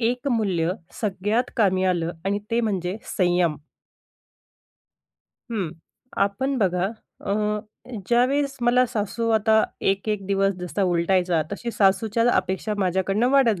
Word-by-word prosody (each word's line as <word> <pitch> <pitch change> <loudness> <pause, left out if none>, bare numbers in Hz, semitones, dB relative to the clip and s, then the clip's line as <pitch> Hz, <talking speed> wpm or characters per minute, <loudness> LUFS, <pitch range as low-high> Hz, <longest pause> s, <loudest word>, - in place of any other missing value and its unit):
एक 245 +4 0
मूल्य 190 -8 +1 0.3
सगळ्यात 210 +4 0
कामी 190 -4 +2
आलं 175 -2 0
आणि 200 +1 0
ते 230 +1 +2
म्हणजे 190 -4 -1 0.2
संयम. 175 -4 +2 1.9
हं, 195 -8 -2 0.5
आपण 260 +8 0
बघा 180 -3 +1 0.3
अ, - - -3 0.8
ज्यावेळेस 275 +4 +2
मला 250 +1 +4
सासू 230 0 -2
आता 220 0 +4 0.2
1-1 195 0 -1
दिवस 195 0 +2
जसा 180 +3 -2
उलटायचा, 175 -1 +2
तशी 235 +4 -4
सासूच्या 220 +2 +2
अपेक्षा 190 +3 -1
माझ्याकडनं 195 +4 +1
वाढत 245 -8 +3
200 Hz, 115 wpm, -24 LUFS, 185-230 Hz, 1.9 s, मला